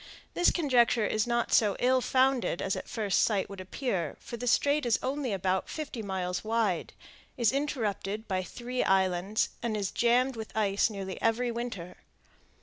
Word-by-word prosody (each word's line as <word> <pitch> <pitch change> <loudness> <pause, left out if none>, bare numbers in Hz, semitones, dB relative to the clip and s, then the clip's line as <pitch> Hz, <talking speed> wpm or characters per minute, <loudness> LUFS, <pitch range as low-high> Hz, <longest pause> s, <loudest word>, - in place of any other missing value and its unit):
This 350 - +4
conjecture 245 -8 +3
is 215 +2 0
not 235 0 0
so 210 -3 +4
ill 255 +1 +3
founded 260 -8 +2
as 195 - -1
at - - -7
first 210 -5 +1
sight 200 -3 +1
would 195 -1 -7
appear; 185 - -3
for - - -7
the 245 +1 -5
Strait 285 +5 +3
is 240 -2 +2
only 270 -2 -2
about 190 -1 -1
fifty 295 -7 -5
miles 185 -3 -3
wide, 220 -5 0 0.4
is 235 -4 +3
interrupted 220 -7 -2
by 185 -2 0
three 245 +7 -3
islands, 190 +2 +1
and 225 -2 -1
is 200 -2 -2
jammed 250 +2 +2
with 220 -1 -7
ice 200 0 +2
nearly 195 -3 -6
every 235 +2 +1
winter. 230 -7 -5
225 Hz, 165 wpm, -29 LUFS, 195-245 Hz, 0.4 s, This